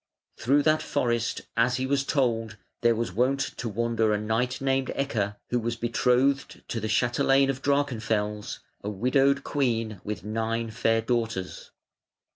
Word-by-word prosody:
Through 140 +6 +3
that 155 0 +3
forest, 120 -6 -1
as 120 +2 +2
he 130 - -1
was 140 +1 +1
told, 115 -6 0 0.2
there 120 -1 +4
was 115 -4 -2
wont 130 +6 +2 0.2
to 120 - -3
wander 115 0 +1
a 105 - +1
knight 115 +4 -1
named 135 -1 0
Ecke, 105 -7 -1 0.2
who 125 - +2
was 115 0 -2
betrothed 125 +4 +1
to 120 - -2
the 110 0 -3
chatelaine 135 +4 +3
of 135 0 -8
Drachenfels, 110 -7 -1 0.2
a 105 - -2
widowed 135 +6 +2
queen 115 -7 -1
with 105 -1 -5
nine 115 +2 -2
fair 115 +1 +1
daughters. 115 -5 -2
120 Hz, 150 wpm, -27 LUFS, 110-135 Hz, 0.2 s, there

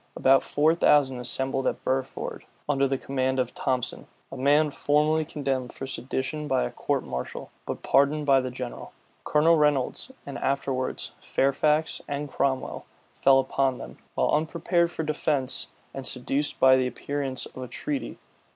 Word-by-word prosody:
About 135 +1 +5
four 155 +2 +2
thousand 145 -6 +3
assembled 135 +2 -1
at - - -2
Burford, 130 0 -3 0.2
under 140 -1 +2
the 135 0 0
command 130 0 -1
of 125 -1 0
Thomson, 125 -2 -2 0.2
a - - -6
man 145 +3 +3
formerly 150 +3 +2
condemned 135 -5 -3
for 135 - -6
sedition 130 +4 -3
by 60 - +2
a - - -3
court - - -1
martial, 65 0 -6 0.2
but - - -4
pardoned 145 +2 +3
by 135 -2 +5
the 130 - -3
general. 125 -1 -7 0.3
Colonel 160 +2 +4
Reynolds, 150 - +1 0.2
and 140 - -6
afterwards 135 -1 -1
Fairfax 150 +3 +1
and 145 0 -3
Cromwell, 130 -1 -1 0.3
fell 135 0 +5
upon 135 -1 +1
them, - - -10 0.2
while - - +2
unprepared 170 +2 +1
for 165 - -4
defence, 145 -3 -1 0.3
and 135 - -5
seduced 135 +3 -1
by 130 0 +7
the 130 -1 +1
appearance 135 +1 -3
of - - -13
a 125 - -5
treaty. 285 - -4
135 Hz, 155 wpm, -26 LUFS, 130-150 Hz, 0.3 s, by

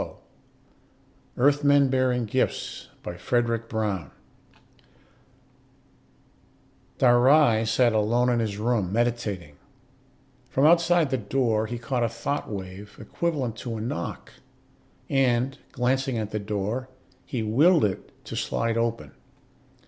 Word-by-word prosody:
EARTHMEN 145 +1 +4
BEARING 130 -2 +1
GIFTS 130 +5 -2 0.2
By 85 - -6
FREDRIC 115 +3 -1
BROWN 100 -9 -2
Illustrated - - -29 2.8
by - - -31
CARTER 120 0 +6
Dhar - - +2
Ry 130 -5 +5
sat 115 +2 +3
alone 115 +3 +2
in 120 -1 +2
his 105 -3 -2
room, 110 -4 0
meditating. 105 -9 -2 0.9
From 135 - +2
outside 170 -2 +4
the 130 - +1
door 110 0 0
he 120 +2 -4
caught 120 +1 -2
a 115 - +1
thought 115 +5 -3
wave 100 0 -8
equivalent 145 -9 -2
to 115 -2 -5
a - - -5
knock, 85 -7 -5 0.7
and, 130 -1 +1
glancing 130 0 0
at 110 -1 -3
the 105 - -2
door, 105 +5 -3 0.3
he 120 -3 -4
willed 145 +8 +4
it 95 -2 -4
to - - -7
slide 115 0 -1
open. 115 0 -2
120 Hz, 125 wpm, -25 LUFS, 110-130 Hz, 2.8 s, CARTER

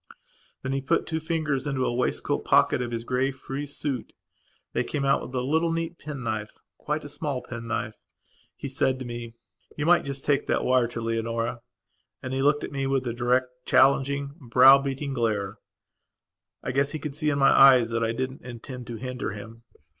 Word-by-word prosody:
Then 130 - -2
he 135 - -1
put 130 - +1
two 160 -1 -2
fingers 155 -4 -1
into 135 -2 -1
the 125 - +1
waistcoat 125 +1 -1
pocket - - +4
of 120 - -2
his 115 -1 -4
grey, 130 +2 0
frieze 140 +2 -6
suit; 135 -5 -3 0.6
they - - +1
came 140 -1 -2
out 135 - +3
with 125 - -8
a 125 - +1
little 160 +6 +1
neat 165 +1 -3
pen 145 -3 -6
knifequite 110 +7 -4
a - - -7
small 145 -2 -4
pen 115 -1 -7
knife. 115 - -3 0.6
He - - -6
said 130 -1 0
to 130 - -7
me: 120 -1 -7 0.4
"You 150 - -1
might 175 +1 +5
just 140 -1 -5
take 145 -2 +1
that - - +1
wire 125 -2 +3
to 115 0 -6
Leonora." 115 +1 -2 0.6
And 130 0 -4
he 135 - 0
looked 145 +1 +3
at - - -5
me 135 -1 -2
with 135 -1 0
a 120 - -2
direct, 125 +1 +1 0.2
challenging, 140 +1 +3
brow 130 +2 +7
beating 140 +1 -3
glare. 110 -5 -1 1.0
I - - -2
guess 140 +3 +1
he - - -2
could 150 -1 -5
see 150 +1 -1
in 145 - 0
my 135 - +5
eyes 130 -4 +7
that 115 0 0
I 115 - +1
didn't 130 +3 -4
intend 125 +1 -8
to 120 - -5
hinder 125 -2 -4
him. 110 +3 -10
130 Hz, 200 wpm, -26 LUFS, 120-140 Hz, 1.0 s, brow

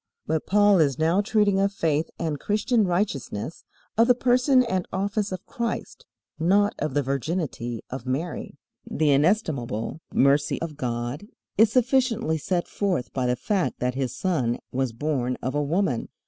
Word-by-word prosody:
But 160 -1 -1
Paul 205 -1 +5
is 140 -5 +2
now 165 +5 +3
treating 205 -2 +2
of 195 0 +2
faith 160 -5 0
and 155 -3 -2
Christian 215 +2 +1
righteousness, 170 - -2 0.3
of 230 - +6
the 250 - +6
person 255 +2 +4
and 190 -7 -2
office 200 +1 -1
of 185 -1 -6
Christ, 235 -1 -4 0.3
not 200 +5 +3
of 150 -2 -2
the 145 - +2
virginity 135 -4 -3
of 130 -1 -6
Mary. 150 +6 -3 0.3
The 150 -1 +2
inestimable 140 - 0
mercy 140 +2 +3
of 165 -2 -5
God 125 +5 -3 0.3
is 215 +1 +5
sufficiently 240 - +2
set 175 +3 -1
forth 185 -11 -2
by 130 -2 0
the 125 - +2
fact 185 - -1
that 125 0 0
His 130 -2 -3
Son 130 -11 0
was 130 -1 -1
born 125 0 -1
of 130 - -3
a 145 - +1
woman. 150 - 0
160 Hz, 160 wpm, -25 LUFS, 135-205 Hz, 0.3 s, of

